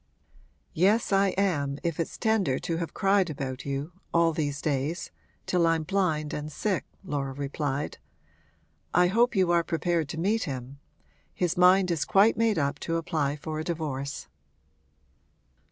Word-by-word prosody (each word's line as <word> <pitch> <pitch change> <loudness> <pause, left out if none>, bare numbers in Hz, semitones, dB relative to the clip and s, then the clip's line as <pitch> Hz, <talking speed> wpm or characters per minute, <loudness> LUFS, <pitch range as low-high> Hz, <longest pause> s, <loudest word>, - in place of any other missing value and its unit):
'Yes, 205 +8 +2
I 195 0 +4
am, 145 -8 0
if 170 -2 -2
it's 165 - -3
tender 220 - +1
to 165 - -3
have 165 -2 -3
cried 195 -2 +3
about 135 -3 -5
you 140 +4 -3 0.2
all 170 -1 +3
these 145 -3 -2
days 150 +4 -2 0.3
till 175 -2 +2
I'm 165 -1 +2
blind 160 -4 0
and 150 +1 -4
sick!' 195 +6 -1 0.2
Laura 140 -6 -3
replied. 140 +1 -3 1.0
'I 180 +1 +6
hope 235 +4 +3
you 185 -3 +3
are 170 -1 +3
prepared 165 -1 -1
to 160 - -5
meet 210 +5 +1
him. 135 -1 -6 0.6
His 175 -2 0
mind 180 +1 +5
is 160 -4 0
quite 200 +3 +4
made 225 -2 +2
up 140 -2 0
to 165 0 -1
apply 155 -4 -1
for 155 +1 -5
a - - -2
divorce.' 150 -5 -4
165 Hz, 155 wpm, -27 LUFS, 145-185 Hz, 1.0 s, I